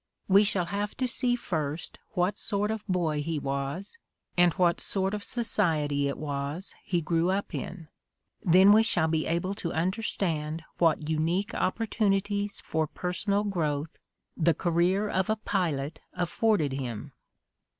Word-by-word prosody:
"We 200 +2 +6
shall 195 -4 0
have 200 +4 -3
to 255 - 0
see 245 +1 +1
first 160 -8 -3
what 185 +1 0
sort 205 0 0
of 220 -1 -3
boy 165 -6 0
he 160 +1 -2
was, 140 - -4 0.4
and 175 -1 +5
what 175 0 +2
sort 195 0 0
of 210 -1 -3
society 160 - +1
it 140 - -3
was 145 +4 -4
he 175 -3 0
grew 165 +2 +1
up 195 +2 -1
in; 170 -4 -5 0.5
then 185 +3 +6
we 215 +2 +7
shall 175 -8 +2
be 160 -1 0
able 170 +4 0
to 175 -4 -4
under 185 +7 0
stand 160 -6 -2 0.2
what 160 -2 +3
unique 165 +6 0
opportunities 205 0 0
for 160 -1 -1
personal 200 +5 -1
growth 155 -6 -2 0.4
the 170 -2 +3
career 180 +5 +2
of 190 -1 0
a 220 - +3
pilot 165 -9 -1
afforded 180 -3 +1
him. 125 -5 -4
175 Hz, 150 wpm, -28 LUFS, 155-200 Hz, 0.5 s, we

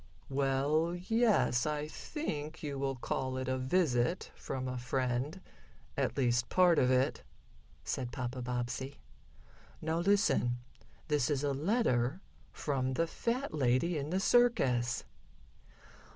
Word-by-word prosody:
"Well, 140 +5 +1
yes, 195 - +2
I 150 0 -1
think 155 - -5
you 140 -2 -3
will 135 -1 -1
call 130 +1 -2
it 130 0 -3
a 130 0 0
visit 135 +1 +1
from 130 -1 -4
a 125 0 -3
friend 130 +5 -1 0.6
at - - -1
least 120 -2 +2
part 180 -2 +5
of 125 - +3
it," 130 +1 +2 0.6
said 125 -2 -3
Papa 125 +1 -4
Bobbsey. 125 +3 -3 0.8
"Now 160 +1 -1
listen. 175 - +2 0.5
This 150 -4 +1
is 145 -2 0
a 145 -1 +1
letter 145 - +1 0.3
from 130 -3 -1
the 165 - +2
fat 235 - -2
lady 135 +4 +2
in 145 0 -2
the 185 +3 +1
circus." 130 - +3
140 Hz, 125 wpm, -33 LUFS, 125-165 Hz, 0.8 s, part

